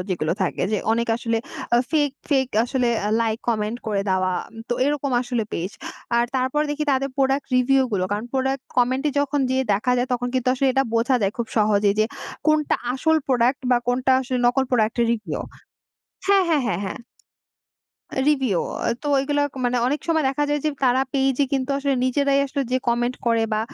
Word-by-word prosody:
যেগুলো 165 -3 0
থাকে 185 - -1
যে, 210 - +2
অনেক 235 +1 0
আসলে 230 -1 -1 0.4
আ - - +5
ফেক, 295 -3 +2 0.2
ফেক 270 -3 +2 0.2
আসলে 250 0 0 0.2
আ - - 0
লাইক 225 -1 0
কমেন্ট 220 +1 -1
করে 205 -2 0
দেওয়া 185 0 +1 0.4
তো - - 0
এরকম 285 -1 -1
আসলে 245 -2 -2
পেজ। 180 +3 -3 0.5
আর 235 - +4
তারপর 260 +3 0
দেখি 300 +1 -2
তাদের 275 +1 0
প্রোডাক্ট 270 0 +1
রিভিউগুলো। 250 -6 +2
কারণ 205 +2 -2
প্রোডাক্ট 265 0 0
কমেন্টে 260 +4 +2
যখন 285 0 0
যেয়ে 260 0 +1
দেখা 220 +5 0
যায় 245 +1 0
তখন 245 0 -1
কিন্তু 255 0 +1
আসলে 270 +1 +1
এটা 270 +1 +2
বোঝা 235 +3 +3
যায় 195 0 +1
খুব 235 - -1
সহজেই 205 -1 +3
যে, - - +4 0.4
কোনটা 305 -1 +2 0.2
আসল 320 +4 +2
প্রোডাক্ট 255 +1 +2
বা 245 - +5
কোনটা 255 +2 +2
আসলে 255 -1 -2
নকল 265 +2 +2
প্রোডাক্টের 235 -1 +2
রিভিউ। 225 -2 -4 0.9
হ্যা, 400 0 +5
হ্যা, 320 -3 +3
হ্যা, 215 - 0
হ্যা। 190 - -4 1.3
রিভিউ, 265 - +2 0.3
আ - - +2
তো - - -5
ওইগুলা 290 +2 +1 0.2
মানে 245 0 +1
অনেক 290 +4 0
সময় 320 -2 +2
দেখা 275 +2 0
যায় 295 0 +1
যে, - - +3 0.2
তারা 255 0 +3
পেইজ 270 -1 +1
এ - - +4
কিন্তু 270 -1 0
আসলে 280 0 0
নিজেরাই 275 +2 +2
আসলে 280 0 -2
যেয়ে 255 0 0
কমেন্ট 240 +1 0
করে 230 -1 +3
বা 215 - +1
255 Hz, 185 wpm, -22 LUFS, 230-275 Hz, 1.3 s, আ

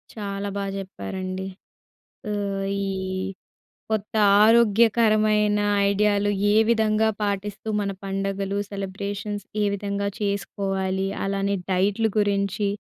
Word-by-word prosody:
చాలా 200 -1 -4
బాగా 200 -1 -2
చెప్పారండి. 185 - -5 0.8
ఆహ్, 200 -1 -2 0.2
ఈ - - -1 1.0
కొత్త 215 -1 -2 0.3
ఆరోగ్యకరమైన 215 -2 +4 0.3
ఐడియాలు 205 0 +2 0.2
ఏ - - +3
విధంగా 220 -1 +3
పాటిస్తూ 205 +1 -3
మన 200 -1 -1
పండుగలు 195 0 -2
సెలబ్రేషన్స్ 200 +1 -4 0.2
ఏ - - +3
విధంగా 200 0 -2
చేసుకోవాలి? 195 -2 -1 0.2
అలానే 200 0 0
డైట్‌లు 200 +4 +2
గురించి, 200 0 +1
200 Hz, 95 wpm, -24 LUFS, 195-210 Hz, 1.0 s, ఆరోగ్యకరమైన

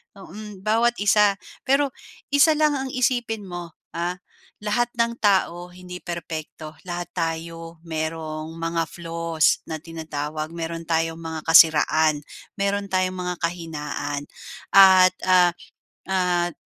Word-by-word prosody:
mm, 200 +1 -10
bawat 235 +2 +3
isa. 205 0 +4 0.3
Pero 275 +1 +3 0.4
isa 285 +3 +6
lang 300 -1 +3
ang 265 0 -3
isipin 240 -3 0
mo, 175 -3 -7 0.2
ha, 175 +2 -2 0.4
lahat 235 +3 0
ng 235 0 +1
tao 180 -4 +1
hindi 180 0 -9
perpekto. 160 -2 -7
Lahat 175 -1 -5
tayo 165 0 -4
merong 160 -1 -4
mga 165 0 -1
flaws 165 -1 0
na 160 - -3
tinatawag. 155 -2 -5
Meron 165 0 -5
tayong 165 0 0
mga 160 -1 -5
kasiraan. 155 -1 +5 0.4
Meron 200 0 0
tayong 185 0 0
mga 180 0 -3
kahinaan 150 -4 -3 0.5
at, 190 -2 +8
ah, 180 -1 +5 0.6
at 180 -2 +1
175 Hz, 120 wpm, -23 LUFS, 160-200 Hz, 0.6 s, at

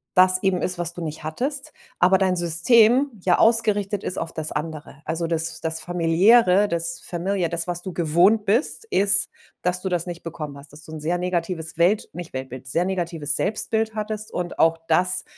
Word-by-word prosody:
das 185 0 +4
eben 190 -2 0
ist, 180 -1 -2
was 170 0 -1
du 175 - -7
nicht 155 -1 -6
hattest, 265 - -4 0.3
aber 185 +2 +5
dein 185 -1 +1
System 225 - +4
ja 180 -2 +3
ausgerichtet 210 -3 +2
ist - - -3
auf 165 - -4
das 160 -1 -4
andere. 150 -1 -6
Also, 165 +1 -2
das 165 -1 -1
das 160 0 -2
Familiäre, 180 +5 +3
das 170 -1 -2
familiar, 180 0 -2
das, 170 0 -1
was 175 0 -2
du 185 -3 -6
gewohnt 175 +6 +3
bist, 240 - 0
ist, 200 - +4 0.3
dass 180 0 0
du 190 - -2
das 175 0 -2
nicht 175 -1 -7
bekommen 150 -4 -7
hast, 140 +1 -13
dass 155 - -10
du 160 - -12
'n 155 - -6
sehr 175 +3 -1
negatives 170 -2 -3
Welt 185 +5 +2
nicht 175 -3 -9
Weltbild, 130 -1 -7
sehr 170 +7 0
negatives 170 -5 0
Selbstbild 220 +1 0
hattest 215 0 -5
und 175 -1 -4
auch 165 0 +3
das 180 +3 +3
175 Hz, 190 wpm, -22 LUFS, 165-195 Hz, 0.3 s, aber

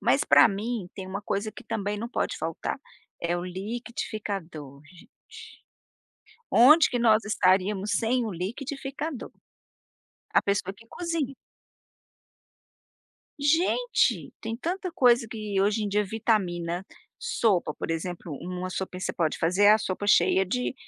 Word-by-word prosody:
mas - - +2
pra - - +7
mim, 210 -1 -3
tem 190 -1 -7
uma 195 +2 -4
coisa 205 +1 -3
que 245 - -11
também 205 -2 -3
não 230 +2 -4
pode - - -2
faltar, - - -4 0.4
é 170 +1 0
o 175 - -4
liquidificador, 190 - -5
gente. 175 0 -17 1.4
Onde 305 +7 +7
que 245 - -1
nós 220 -2 +4
estaríamos 195 +1 +2
sem 240 +1 +1
o 215 - -3
liquidificador? 270 - -5 1.0
A - - +5
pessoa 200 -1 -1
que 230 +3 -18
cozinha. 330 -5 -3 2.0
Gente, 345 +12 +2
tem 225 0 -4
tanta 360 - -3
coisa 240 -2 +4
que 210 -3 -2
hoje 210 +2 +2
em 205 - -1
dia 210 +1 +1
vitamina, 185 -5 -1 0.3
sopa, 220 - +1
por - - -5
exemplo, 170 0 -4
uma 180 +1 -4
sopinha 185 0 -5
que - - -2
você - - -2
pode 160 -3 -1
fazer 180 +5 +2
é 205 - +9
a 215 - +5
sopa 200 0 -3
cheia 190 -2 +4
de, 250 +7 -2
210 Hz, 140 wpm, -27 LUFS, 185-240 Hz, 2.0 s, é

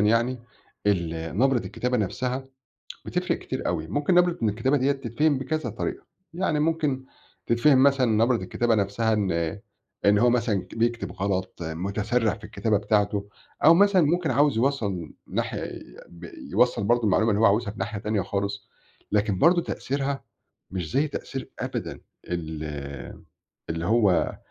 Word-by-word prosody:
يعني، 115 +4 +2 0.5
النَبرة 90 +7 +1
الكتابة 125 +2 -2
نَفسَها، 125 +5 -2 0.6
بتفرِق - - -1
كتير - - -5
أوي. 80 -3 -1
ممكن 145 - 0
نَبرة 175 -1 +4
من 110 - +3
الكتابة 115 +7 +1
دِيَّة 135 +1 +2
تتفهم 135 +2 0
بكذا 135 -1 -2
طريقة، 110 - -4 0.3
يعني 165 -4 0
ممكن 150 -4 0 0.4
تتفهم 130 +3 +4
مثلًا 135 -2 +4 0.2
نَبرة 125 0 +2
الكتابة 115 +4 0
نَفسَها 105 +2 +1
إن 95 -3 -1 0.4
إن 105 0 +5
هو 120 +3 +4
مثلًا 115 -5 +1
ك 90 - -13
بيكتب 115 0 -1
غلط، 95 -1 -2
مُتسرِّع 100 +8 -1
في 110 -1 -14
الكتابة 110 0 0
بتاعته، 105 -1 0 0.4
أو 160 +3 +9
مثلًا 195 0 +5
ممكن 165 +2 +1
عاوز 145 -3 +3
يوصَّل 110 - -1
ناحية - - -3 0.4
ب 85 - -13 0.3
يوصَّل 100 - +3
برضه 120 +3 +2
المعلومة 110 +2 +3
اللي 105 0 +1
هو 110 - +6
عاوزها 105 +1 +2
في 105 - -12
ناحية 105 - -3
تانية 105 -1 -1
خالص، 100 +1 -3 0.4
لكن 105 -2 +1
برضه 170 - +5
تأثيرها 140 -2 -3 0.5
مش 90 -4 -4
زي 140 +4 +2
تأثير 135 -2 -6
أبدًا - - -4 0.3
ال 80 -3 -4 1.1
اللي 80 +1 -2
هو 105 -4 +2
115 Hz, 145 wpm, -25 LUFS, 100-135 Hz, 1.1 s, أو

